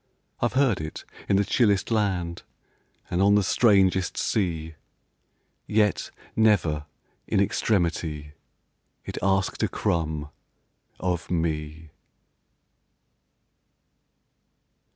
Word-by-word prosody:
I -, -, +2 dB
've -, -, -7 dB
heard 130 Hz, -, +2 dB
it 75 Hz, 0 st, -7 dB, 0.2 s
in 100 Hz, -, +4 dB
the 100 Hz, +1 st, +3 dB
chillest 105 Hz, -1 st, +2 dB
land, 95 Hz, -6 st, 0 dB, 0.7 s
And 90 Hz, -, +1 dB
on 100 Hz, +1 st, +5 dB
the 105 Hz, -, +4 dB
strangest 95 Hz, -3 st, +3 dB
sea; 80 Hz, -6 st, -1 dB, 0.9 s
Yet, 105 Hz, -2 st, +1 dB, 0.3 s
never, 85 Hz, -9 st, +2 dB, 0.4 s
in -, -, +1 dB
extremity, 85 Hz, -7 st, 0 dB, 0.7 s
It -, -, -5 dB
asked 95 Hz, 0 st, +1 dB
a -, -, +2 dB
crumb 80 Hz, -3 st, -2 dB, 0.7 s
of 90 Hz, -1 st, -2 dB
me. 80 Hz, -2 st, -3 dB
90 Hz, 90 wpm, -25 LUFS, 80-100 Hz, 0.9 s, on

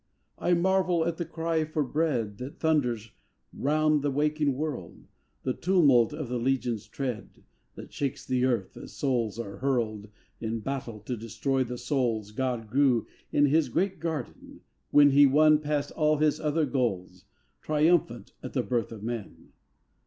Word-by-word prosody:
I 175 Hz, -, +2 dB
marvel 180 Hz, -1 st, +2 dB
at 170 Hz, -1 st, -2 dB
the 170 Hz, -, -3 dB
cry 165 Hz, 0 st, -1 dB
for 155 Hz, -1 st, -1 dB
bread 125 Hz, -8 st, -1 dB
That 130 Hz, +3 st, -8 dB
thunders 125 Hz, -9 st, 0 dB, 0.4 s
round 155 Hz, +1 st, +2 dB
the 145 Hz, -, 0 dB
waking 150 Hz, 0 st, +1 dB
world; 150 Hz, -1 st, -5 dB, 0.4 s
The 130 Hz, -, 0 dB
tumult 145 Hz, -, +4 dB
of 150 Hz, -2 st, -5 dB
the 125 Hz, 0 st, -2 dB
legion's 120 Hz, -3 st, -1 dB
tread 125 Hz, -5 st, -5 dB, 0.3 s
That -, -, -11 dB
shakes 140 Hz, 0 st, -3 dB
the 125 Hz, -1 st, 0 dB
earth, 115 Hz, -7 st, -1 dB
as -, -, -10 dB
souls 115 Hz, -2 st, -1 dB
are 100 Hz, -4 st, -6 dB
hurled 110 Hz, -5 st, -1 dB, 0.3 s
In 115 Hz, 0 st, -3 dB
battle 125 Hz, -3 st, -5 dB
to 125 Hz, +4 st, -4 dB
destroy 115 Hz, +4 st, -1 dB
the 125 Hz, 0 st, -6 dB
souls 115 Hz, -7 st, -1 dB
God 120 Hz, -1 st, -2 dB
grew 130 Hz, -1 st, +2 dB, 0.3 s
in 145 Hz, -, +4 dB
His 145 Hz, -1 st, +2 dB
great 190 Hz, -, -1 dB
garden, 160 Hz, -5 st, -5 dB, 0.3 s
when 145 Hz, -1 st, +6 dB
He 140 Hz, +1 st, +7 dB
won 150 Hz, +2 st, +5 dB
past 145 Hz, -1 st, -2 dB
all 155 Hz, -1 st, +2 dB
His 150 Hz, 0 st, +2 dB
other 155 Hz, +1 st, +1 dB
goals 95 Hz, -9 st, -2 dB, 0.4 s
Triumphant 150 Hz, -, +1 dB
at -, -, -7 dB
the -, -, 0 dB
birth 120 Hz, -3 st, -1 dB
of 110 Hz, -2 st, -9 dB
men! 115 Hz, -2 st, -6 dB
135 Hz, 160 wpm, -28 LUFS, 115-155 Hz, 0.4 s, He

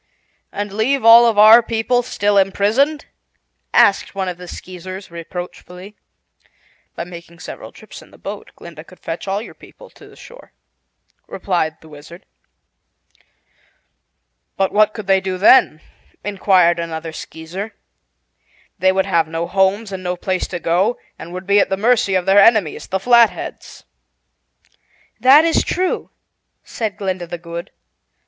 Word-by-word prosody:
"And 205 Hz, -1 st, -5 dB
leave 230 Hz, +4 st, 0 dB
all 230 Hz, +1 st, +8 dB
of 225 Hz, -3 st, 0 dB
our 215 Hz, +3 st, +8 dB
people 230 Hz, +2 st, 0 dB
still 205 Hz, -4 st, -1 dB
imprisoned?" 220 Hz, +10 st, +1 dB, 0.7 s
asked 200 Hz, 0 st, +3 dB
one 190 Hz, -1 st, -3 dB
of 180 Hz, -1 st, -5 dB
the 180 Hz, -, -10 dB
Skeezers 185 Hz, +1 st, -9 dB
reproachfully. 180 Hz, +3 st, -9 dB, 1.0 s
"By -, -, -4 dB
making 170 Hz, -1 st, -12 dB
several 165 Hz, -, -10 dB
trips -, -, -13 dB
in -, -, -18 dB
the -, -, -19 dB
boat, -, -, -8 dB
Glinda -, -, -12 dB
could -, -, -18 dB
fetch -, -, -6 dB
all 200 Hz, +3 st, -2 dB
your -, -, -12 dB
people -, -, -17 dB
to -, -, -17 dB
the -, -, -17 dB
shore," -, -, -15 dB, 0.7 s
replied 175 Hz, -5 st, -2 dB
the 160 Hz, -, -16 dB
Wizard. 155 Hz, +4 st, -14 dB, 2.3 s
"But 195 Hz, 0 st, 0 dB
what 215 Hz, 0 st, +2 dB
could 215 Hz, -, -7 dB
they 190 Hz, 0 st, +2 dB
do 190 Hz, -1 st, -4 dB
then?" 185 Hz, -5 st, +4 dB, 0.4 s
inquired 185 Hz, -4 st, +2 dB
another 165 Hz, -1 st, -5 dB
Skeezer. 180 Hz, +8 st, -8 dB, 1.0 s
"They 190 Hz, +2 st, +3 dB
would 190 Hz, 0 st, 0 dB
have 165 Hz, -2 st, +1 dB
no 165 Hz, +1 st, -4 dB
homes 195 Hz, +3 st, 0 dB
and 190 Hz, -1 st, -6 dB
no 180 Hz, 0 st, -3 dB
place 185 Hz, +1 st, -3 dB
to 175 Hz, -, -6 dB
go, 185 Hz, +9 st, 0 dB, 0.2 s
and 170 Hz, -, -10 dB
would 185 Hz, +1 st, -7 dB
be 200 Hz, +1 st, +3 dB
at -, -, +1 dB
the 195 Hz, -, -1 dB
mercy 215 Hz, -2 st, +2 dB
of 180 Hz, -1 st, 0 dB
their 195 Hz, +1 st, +5 dB
enemies, 205 Hz, -6 st, +3 dB
the 190 Hz, -, -2 dB
Flatheads." 235 Hz, +1 st, +1 dB, 1.4 s
"That 280 Hz, +5 st, +6 dB
is 330 Hz, -, +2 dB
true," 370 Hz, 0 st, -2 dB, 0.5 s
said 215 Hz, -4 st, -5 dB
Glinda 185 Hz, -4 st, -4 dB
the 175 Hz, -, -6 dB
Good. 170 Hz, 0 st, -8 dB
195 Hz, 150 wpm, -18 LUFS, 175-215 Hz, 2.3 s, all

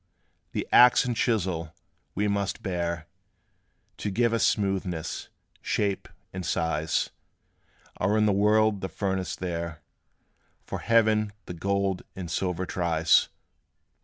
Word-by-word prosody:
The -, -, -2 dB
axe 125 Hz, 0 st, +7 dB
and 120 Hz, -1 st, -1 dB
chisel, 90 Hz, -9 st, -1 dB, 0.4 s
we 105 Hz, +2 st, +1 dB
must 100 Hz, -1 st, -1 dB
bear, 85 Hz, -3 st, -2 dB, 0.9 s
To 105 Hz, -, -3 dB
give 115 Hz, +3 st, +1 dB
us 115 Hz, -, +2 dB
smoothness, 95 Hz, -5 st, -1 dB, 0.3 s
shape, 100 Hz, -2 st, -1 dB, 0.3 s
and 95 Hz, 0 st, -4 dB
size, 80 Hz, -2 st, 0 dB, 0.9 s
Are 105 Hz, +3 st, +1 dB
in 105 Hz, -, +4 dB
the 105 Hz, -, +4 dB
world 105 Hz, +1 st, +3 dB
the 95 Hz, -, -3 dB
furnace 95 Hz, -2 st, -2 dB
there; 85 Hz, -3 st, -4 dB, 0.8 s
For -, -, -4 dB
Heaven 110 Hz, -2 st, +3 dB
the -, -, -6 dB
gold 100 Hz, +2 st, 0 dB
and 90 Hz, -4 st, -6 dB
silver 90 Hz, +1 st, -1 dB
tries. 85 Hz, -2 st, +2 dB
95 Hz, 120 wpm, -27 LUFS, 85-105 Hz, 0.9 s, axe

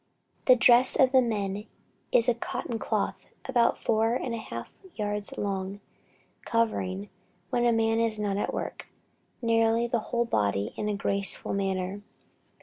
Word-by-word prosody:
The 255 Hz, -, +7 dB
dress 250 Hz, 0 st, +5 dB
of 260 Hz, -1 st, +4 dB
the 260 Hz, -1 st, +6 dB
men 205 Hz, -3 st, -2 dB, 0.4 s
is 230 Hz, -, +4 dB
a 245 Hz, -, +5 dB
cotton 230 Hz, 0 st, -4 dB
cloth 200 Hz, -4 st, -2 dB, 0.2 s
about 240 Hz, -3 st, +2 dB
four 225 Hz, +1 st, +1 dB
and 250 Hz, -1 st, -2 dB
a 230 Hz, -, -3 dB
half 115 Hz, -, -7 dB, 0.2 s
yards 210 Hz, -1 st, -3 dB
long, 195 Hz, 0 st, -3 dB, 0.6 s
covering, 205 Hz, -4 st, -1 dB, 0.4 s
when 240 Hz, 0 st, +2 dB
the 240 Hz, -, +5 dB
man 225 Hz, 0 st, +2 dB
is 225 Hz, -2 st, +1 dB
not 205 Hz, -2 st, -1 dB
at -, -, -1 dB
work, -, -, -5 dB, 0.6 s
nearly 230 Hz, 0 st, +3 dB
the 235 Hz, 0 st, 0 dB
whole 235 Hz, 0 st, +1 dB
body 100 Hz, -, 0 dB
in 210 Hz, -, -2 dB
a 210 Hz, -, 0 dB
graceful 200 Hz, 0 st, 0 dB
manner. 195 Hz, 0 st, -2 dB
220 Hz, 150 wpm, -28 LUFS, 200-235 Hz, 0.6 s, The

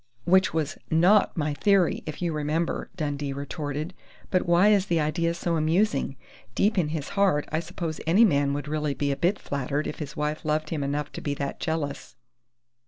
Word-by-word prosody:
"Which 185 Hz, +2 st, +4 dB
was 155 Hz, -2 st, -2 dB
not 180 Hz, +6 st, +4 dB
my 150 Hz, -2 st, 0 dB
theory, 190 Hz, +4 st, +2 dB
if 155 Hz, +3 st, -5 dB
you 170 Hz, -2 st, 0 dB
remember!" 155 Hz, +3 st, -1 dB
Dundee 145 Hz, -4 st, -2 dB
retorted. 145 Hz, +3 st, -4 dB, 0.4 s
"But 185 Hz, -1 st, +1 dB
why 175 Hz, +4 st, +5 dB
is 200 Hz, -2 st, +3 dB
the 170 Hz, -3 st, +2 dB
idea 165 Hz, +2 st, 0 dB
so 170 Hz, -1 st, -1 dB
amusing? 155 Hz, -3 st, +1 dB, 0.4 s
Deep 210 Hz, +2 st, +2 dB
in 165 Hz, -, +1 dB
his 155 Hz, -2 st, -4 dB
heart, 195 Hz, -7 st, +2 dB
I 155 Hz, -, +1 dB
suppose 170 Hz, -1 st, -5 dB
any 195 Hz, +8 st, +6 dB
man 140 Hz, -6 st, +2 dB
would 145 Hz, 0 st, -4 dB
really 150 Hz, -1 st, -1 dB
be 140 Hz, -1 st, 0 dB
a -, -, 0 dB
bit 180 Hz, +8 st, +1 dB
flattered 140 Hz, +2 st, -2 dB
if -, -, -5 dB
his 150 Hz, -3 st, -6 dB
wife 150 Hz, +1 st, -2 dB
loved 155 Hz, 0 st, -1 dB
him 155 Hz, -3 st, -1 dB
enough 145 Hz, +1 st, -2 dB
to -, -, -7 dB
be 145 Hz, -1 st, -2 dB
that 140 Hz, -1 st, -4 dB
jealous." 160 Hz, -4 st, -3 dB
155 Hz, 190 wpm, -26 LUFS, 145-175 Hz, 0.4 s, any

